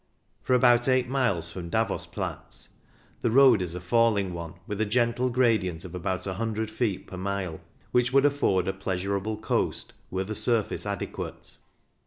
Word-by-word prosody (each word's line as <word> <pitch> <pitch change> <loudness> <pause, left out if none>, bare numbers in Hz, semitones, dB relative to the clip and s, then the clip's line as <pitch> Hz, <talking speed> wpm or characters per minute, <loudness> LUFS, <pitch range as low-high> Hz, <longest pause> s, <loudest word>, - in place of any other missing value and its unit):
For 130 - +2
about 120 0 +4
eight 130 -1 +3
miles 120 -11 0
from 85 -1 -7
Davos - - -1
Platz - - -6 0.5
the - - +1
road 125 -3 +6
is 90 -1 -3
a - - -4
falling 100 0 +2
one, 85 -1 -6
with 105 +1 -3
a - - +2
gentle 120 +3 +1
gradient 110 -9 +1
of 90 - -9
about 90 0 -3
100 110 +2 -2
feet 110 -4 -1
per 95 - -9
mile, 95 -3 -3 0.3
which 125 0 +2
would 135 +1 +4
afford 100 -11 +2
a 95 - 0
pleasurable 100 +2 -2
coast 110 - -1 0.2
were 95 +1 -2
the 105 +3 -5
surface 110 -2 +1
adequate. 100 -2 -5
105 Hz, 165 wpm, -27 LUFS, 95-120 Hz, 0.5 s, road